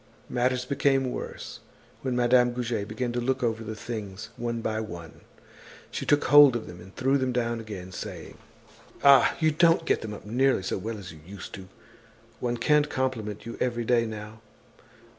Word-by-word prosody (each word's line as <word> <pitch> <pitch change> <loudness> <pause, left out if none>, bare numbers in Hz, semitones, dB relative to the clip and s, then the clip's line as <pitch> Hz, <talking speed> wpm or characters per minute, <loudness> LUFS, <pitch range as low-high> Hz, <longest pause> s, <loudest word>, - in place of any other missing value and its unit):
Matters 125 0 0
became 135 -1 +1
worse - - -6 0.4
when 130 -2 -2
Madame 125 0 +4
Goujet 115 -4 -2
began 120 +3 -3
to 120 - -1
look 130 +1 0
over 115 -1 0
the 110 0 -5
things, 105 -3 -6
one 120 0 -3
by 110 -1 -2
one. 85 -7 -8 0.7
She - - -4
took 145 0 +4
hold 145 -3 +8
of 115 - -3
them 85 - -10
and 95 +2 -14
threw 135 +2 +2
them 130 -1 0
down 120 -1 -1
again 100 -5 -8
saying: - - -8 0.6
"Ah! 140 -1 +7
you 160 -1 +3
don't 165 +1 +4
get - - +1
them 105 -2 -5
up - - -12
nearly 125 0 +2
so 95 - -2
well 110 +3 -4
as 95 -5 -9
you 80 - -14
used 95 +3 -9
to 95 - -7
do. 95 - -13 0.7
One 120 -1 -1
can't 150 +4 +3
compliment 115 -7 -2
you 115 - -7
every 120 -2 0
day 115 -1 +3
now. 110 0 -8
120 Hz, 185 wpm, -27 LUFS, 105-130 Hz, 0.7 s, hold